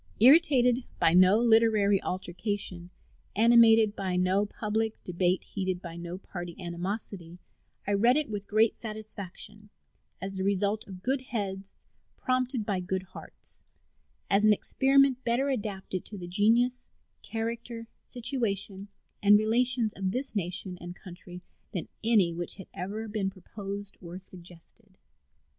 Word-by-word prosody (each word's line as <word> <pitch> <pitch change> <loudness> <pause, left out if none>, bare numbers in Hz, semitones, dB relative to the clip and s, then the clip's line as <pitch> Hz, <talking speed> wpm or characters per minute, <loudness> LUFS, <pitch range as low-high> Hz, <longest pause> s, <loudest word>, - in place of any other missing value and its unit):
Irritated 255 -2 +5 0.2
by 165 - +4
no 185 +3 +6
literary 220 -4 +4
altercation, 185 -1 -3 0.5
animated 225 -1 +6
by 190 -2 -2
no 185 +3 +2
public 220 +1 -2
debate, 180 +1 0
heated 185 -2 -3
by 170 -2 -8
no 170 +1 -6
party 175 -2 -8
animosity, 175 0 -5 0.5
I 205 - 0
read 235 +7 +4
it 305 - 0
with 205 -2 -5
great 220 +1 +3
satisfaction, 210 -1 -7 0.5
as 195 0 -5
the 190 - -2
result 200 +2 0
of 185 -2 -10
good 265 +1 0
heads 195 -3 -4 0.4
prompted 255 -3 -1
by 200 -3 -1
good 185 +1 -3
hearts, 190 - -14 0.7
as 200 +1 +3
an 215 0 +7
experiment 270 +3 +2
better 245 +4 +1
adapted 200 -7 -3
to 210 - -8
the 175 -2 -7
genius, 235 +7 +2 0.4
character, 230 +1 -5
situation, 210 -6 -2 0.3
and 205 0 +7
relations 230 +1 +2
of 190 -1 -2
this 255 +4 -3
nation 185 -1 -2
and 175 +1 -7
country 180 -1 -11 0.3
than 180 - -3 0.2
any 210 -7 +3
which 175 0 -3
had 190 - -10
ever 210 +5 -5
been 205 -2 -1
proposed 200 +1 -8
or 175 0 -8
suggested. 185 +2 -16
205 Hz, 135 wpm, -28 LUFS, 185-225 Hz, 0.7 s, an